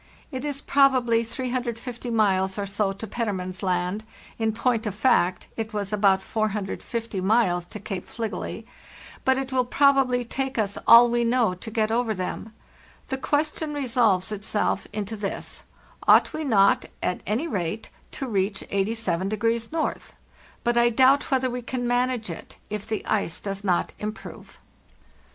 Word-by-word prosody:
* - - -27
It 260 -1 -4
is 285 -1 -3
probably 255 -5 +3
350 245 0 -4
miles 195 -4 +2
or 200 - -1
so 200 0 0
to 195 +3 -7
Petermann's 190 -5 -3
Land 185 +2 -1 0.4
(in 225 -1 +1
point 235 0 0
of 200 - -3
fact 185 -6 +2
it 220 -1 -4
was 205 -1 -3
about 195 -2 +3
450 215 0 -3
miles 185 -4 +2
to 210 - -9
Cape 195 -2 -5
Fligely); 225 -2 -5 0.6
but 265 0 +3
it 270 0 -3
will 255 -1 +2
probably 260 -1 +3
take 265 +2 -3
us 205 -2 0
all 235 +1 +10
we 240 0 +1
know 235 -4 +2
to 180 +5 -8
get 220 0 0
over 230 -1 +1
them. 185 +4 -4 0.6
The 265 - -2
question 300 +1 -1
resolves 230 -8 +2
itself 205 -1 -1
into 210 +1 -4
this: 200 -2 -5 0.4
Ought - - +6
we 315 - -3
not, 200 -7 +4 0.2
at 180 - -1
any 230 - 0
rate, 200 - -3 0.2
to 270 - -4
reach 195 -2 0
87° 215 +2 0
N.? 320 0 -1 0.6
But 240 0 +2
I 240 0 +5
doubt 265 +4 +4
whether 260 -2 +1
we 250 0 -3
can 245 0 -3
manage 245 -4 0
it 165 - -10
if 210 -1 -4
the 220 - -3
ice 200 -5 -1
does 195 0 -5
not 180 -3 +1
improve. 215 +1 -7
225 Hz, 155 wpm, -25 LUFS, 200-245 Hz, 0.6 s, all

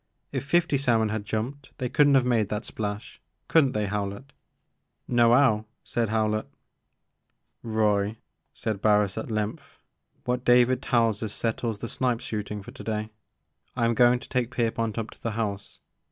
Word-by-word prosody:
If - - -2
fifty 170 -1 +2
salmon 115 -5 +2
had 105 -1 -3
jumped 125 +6 -4
they 125 - -2
could 145 +4 +4
n't 140 - +5
have 130 -2 +4
made 115 -5 +2
that 105 +1 -3
splash. 105 0 -5 0.3
Could 160 -3 +5
n't 130 - -2
they, 105 -1 0
Howlett?" 100 +3 -3
*• 140 - -28 0.7
No 120 -1 +4
'ow," 120 -4 +4 0.2
said 115 -3 -1
Howlett. 110 -1 0 1.1
Roy," 105 -1 +1 0.3
said 110 -3 -4
Barris 105 -2 +3
at 110 - -5
length, 110 -1 -4 0.5
what 125 0 -1
David 125 +1 +4
tells 115 -3 +1
us 110 -3 -3
settles 115 -1 -2
the 115 - -5
snipe 125 0 0
shooting 105 -3 -5
for 120 - -10
to 135 - -10
day. 110 0 -3 0.6
I 120 -2 +1
am 115 - +2
going 120 +1 +5
to 125 - -11
take 125 -3 -1
Pierpont 115 -2 -1
up 115 -1 -3
to - - -17
the 115 - -2
house. 100 -3 -4
115 Hz, 175 wpm, -26 LUFS, 105-125 Hz, 1.1 s, n't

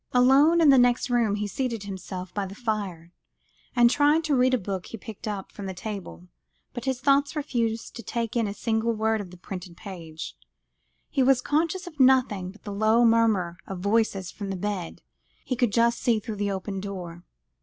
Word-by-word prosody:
Alone, 275 +7 +5
in 310 - +6
the 270 -2 +7
next 245 +1 +3
room, 230 -4 +2
he 210 0 -2
seated 230 +1 -3
himself 185 -2 -7
by 200 -2 -2
the 195 - -9
fire, 200 -8 -3 0.6
and 240 -1 +6
tried 290 +5 +3
to 305 -3 +1
read 255 0 +4
a 255 - +3
book 190 -3 -4
he 230 - -7
picked 215 +1 -9
up 200 -2 -4
from 200 -2 -7
the 190 - -5
table, 175 - -7 0.5
but 240 - -6
his 260 -2 -1
thoughts 280 +3 +2
refused 235 -6 -2
to 235 - -6
take 230 +1 -3
in 230 -3 +1
a 200 - -3
single 225 +1 0
word 220 0 0
of 190 - -9
the 180 - -13
printed 180 -1 -8
page; 165 -6 -8 0.8
he 275 - +1
was 260 -1 +5
conscious 330 +7 0
of 320 -4 -11
nothing 250 -8 +4
but 205 +3 -15
the 205 - -6
low 220 +3 +4
murmur 220 -7 +3
of 195 - -5
voices 200 -3 +1
from 200 -2 -6
the 195 - -2
bed 190 -2 -4 0.4
he 255 - -1
could 245 -3 +1
just 235 +2 +2
see 230 -3 +2
through 215 -1 -6
the 205 0 -1
open 195 0 -3
door. 180 -3 -7
220 Hz, 200 wpm, -26 LUFS, 195-250 Hz, 0.8 s, the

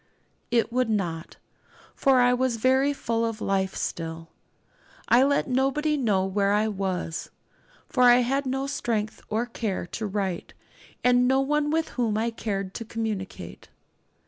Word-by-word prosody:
It 235 0 +1
would 250 -2 +1
not, 175 -6 -2 0.6
for 270 -2 +3
I 245 0 +4
was 250 -1 +1
very 260 +4 +3
full 230 -5 -1
of 225 -1 -2
life 190 -2 -1
still. 165 0 -4 0.8
I 240 - +5
let 280 +1 +2
nobody 275 +4 +1
know 210 -9 +1
where 200 +1 +1
I 210 +1 +2
was, 185 -5 -3 0.6
for 255 - -1
I 245 0 +7
had 270 +3 0
no 265 +1 -1
strength 225 -6 -2
or 220 +3 0
care 220 -6 -3
to 215 +5 -4
write, 195 -3 -3 0.5
and 250 0 +4
no 265 +1 +3
one 295 +2 +1
with 320 +1 0
whom 225 -4 -1
I 230 +2 0
cared 195 -4 -4
to 230 - -5
communicate. 220 -4 -5
230 Hz, 150 wpm, -26 LUFS, 200-260 Hz, 0.8 s, I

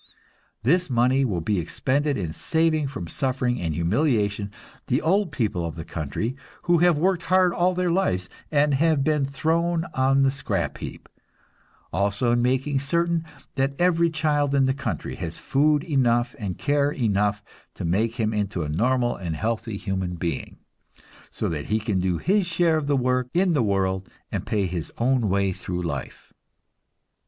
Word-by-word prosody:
This 175 +7 +2
money 125 +2 +3
will 95 -10 -1
be 100 +3 0
expended 140 - 0
in 85 -6 -3
saving 160 - +1
from 115 -11 -6
suffering 125 +2 -1
and 80 -3 -2
humiliation 100 - +1 0.4
the 130 - +2
old 190 +4 +1
people 105 -8 -1
of 85 -1 -4
the 80 -1 -7
country, 95 - -3 0.3
who 175 -1 +3
have 175 -2 +4
worked 180 +2 +2
hard 185 -1 +4
all 180 +1 +2
their 180 -1 +1
lives 95 - 0 0.2
and 145 -1 +3
have 155 0 +3
been 150 -2 +1
thrown 165 +4 0
on 135 +1 +3
the 135 - +4
scrap 100 -10 -2
heap; - - -8 0.9
also 100 +5 +1
in 120 0 +2
making 135 +3 +1
certain 170 +4 0 0.3
that 135 0 0
every 170 -1 +3
child 150 -3 +1
in 135 -1 +4
the 130 - +2
country 140 - -4
has 85 -3 -5
food 145 +2 +2
enough 125 -6 +1
and 100 -5 -4
care 145 0 +2
enough 105 -6 0 0.3
to - - -5
make 110 +7 +1
him 110 -2 0
into 100 -4 -1
a 75 - -4
normal 120 +9 +1
and 85 -4 -4
healthy 110 +2 -2
human 95 -3 -3
being, 85 0 -4 0.7
so - - -3
that 75 -3 -3
he 110 +1 +1
can 105 -3 -1
do 90 -1 0
his 195 - +1
share 165 -2 +2
of 145 -2 -3
work 125 -2 +1
in 180 0 +3
the 145 - +2
world 95 -3 0 0.2
and - - -3
pay 105 -4 +1
his 85 -3 -4
own 120 -2 +2
way 100 0 +2
through 90 0 -4
life." 70 -6 -6
125 Hz, 170 wpm, -24 LUFS, 100-150 Hz, 0.9 s, have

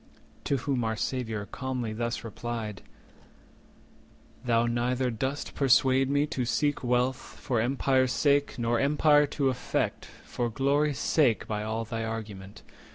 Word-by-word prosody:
To 140 - +1
whom 130 -1 -1
our 110 0 -1
Saviour 110 -3 -3
calmly 125 -2 -4
thus 120 +1 -3
replied:— 115 -2 -5 1.6
"Thou 115 -1 +2
neither 125 +2 0
dost 135 +5 -3
persuade 135 0 +3
me 145 +1 +2
to 135 -4 -3
seek 145 +4 0
wealth 125 +1 +1 0.2
For 120 -6 0
empire's 130 +1 +2
sake, 145 0 +2
nor 120 0 +1
empire 150 +1 +4
to 140 -1 0
affect 125 -1 -2 0.2
For 120 -1 -2
glory's 140 +4 +1
sake, 130 -6 +2
by 105 -1 -2
all 110 +1 -3
thy 115 +1 -4
argument. 105 -3 -6
125 Hz, 135 wpm, -28 LUFS, 115-135 Hz, 1.6 s, empire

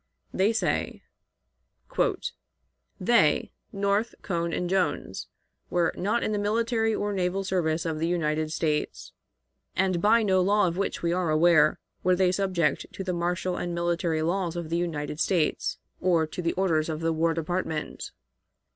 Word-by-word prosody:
They 195 +4 +3
say: 225 - -1 2.0
"They, - - +3 0.2
North, 200 +2 0
Cohn, 170 -2 -1
and 180 - -1
Jones, 185 0 -1 0.4
were 175 -2 +1
not 215 +5 0
in - - -1
the 210 - 0
military 225 +1 +1
or 205 0 -1
naval 190 0 0
service 170 -4 0
of 160 -2 -2
the 165 - 0
United 155 -2 0
States, 155 -2 -2 0.6
and 185 -2 +1
by 225 +3 +4
no 190 -3 +3
law 200 +1 +3
of 170 - -2
which 195 -1 -2
we 170 0 +1
are 180 -2 0
aware 155 -1 +4 0.3
were 185 0 +4
they 180 0 +3
subject 180 -6 0
to 195 - -5
the 185 -1 -2
martial 175 +1 -1
and 175 -1 -3
military 170 -2 0
laws 175 0 -1
of 170 -2 -5
the 170 - +1
United 155 -3 -3
States, 170 -4 +1 0.2
or 175 -3 +2
to 155 +3 -6
the 170 -1 0
orders 165 -4 +1
of 155 0 -3
the 165 0 +1
War 165 +1 +1
Department. 165 -1 -3
175 Hz, 155 wpm, -27 LUFS, 165-190 Hz, 2.0 s, by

